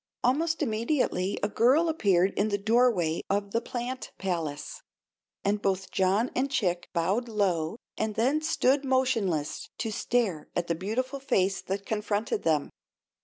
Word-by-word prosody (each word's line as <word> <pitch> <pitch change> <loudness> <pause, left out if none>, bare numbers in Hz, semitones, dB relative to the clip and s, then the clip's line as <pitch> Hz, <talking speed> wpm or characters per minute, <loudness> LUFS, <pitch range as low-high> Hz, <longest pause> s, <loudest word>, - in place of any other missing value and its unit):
Almost 315 +6 +2
immediately 220 -5 0
a - - +3
girl 255 +10 +3
appeared 195 - +2
in 210 +2 +1
the 205 - +1
doorway 205 -6 +2
of 200 0 0
the 230 - +1
plant 250 +2 -4
palace, 165 -6 -3 0.6
and 205 +1 +1
both 190 -1 -1
John 195 +6 +2
and 270 +2 +1
Chick 180 -9 -1
bowed 195 +8 0
low 190 -4 0 0.2
and 215 -1 -1
then 270 +7 +2
stood 280 -3 +2
motionless 240 - 0
to 220 0 -2
stare 210 -8 0
at 175 - 0
the 170 - 0
beautiful 230 - -2
face 195 -8 +1
that 195 +2 -4
confronted 215 0 -1
them. 155 -3 +1
210 Hz, 145 wpm, -28 LUFS, 185-250 Hz, 0.6 s, a